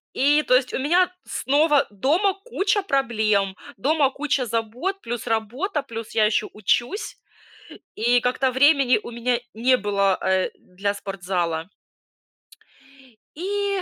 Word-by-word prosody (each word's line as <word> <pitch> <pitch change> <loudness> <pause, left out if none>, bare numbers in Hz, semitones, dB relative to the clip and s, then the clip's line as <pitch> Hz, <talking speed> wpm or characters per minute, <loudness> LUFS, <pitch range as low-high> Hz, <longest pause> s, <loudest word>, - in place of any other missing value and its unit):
И 295 +3 +3
то 255 - +3
есть, 255 -1 +1
у - - -1
меня 355 +6 +2
снова 290 +1 +2
дома 325 - +1
куча 410 -3 0
проблем, 220 - 0 0.2
дома 285 +4 +2
куча 275 -2 -1
забот, 235 - -3
плюс 240 0 -5
работа, 250 - -2
плюс 230 -2 -7
я 215 -1 +4
еще 215 - +1
учусь, 240 - -1 0.8
и 240 +2 +2
как-то 255 +1 0
времени 270 -3 +4
у - - -8
меня 235 +1 -1 0.2
не 255 +3 +3
было, 200 -3 +1
э, 190 0 +1
для 200 +3 -3
спортзала. 180 -3 -3 1.7
И 400 +2 -2
250 Hz, 125 wpm, -23 LUFS, 215-295 Hz, 1.7 s, я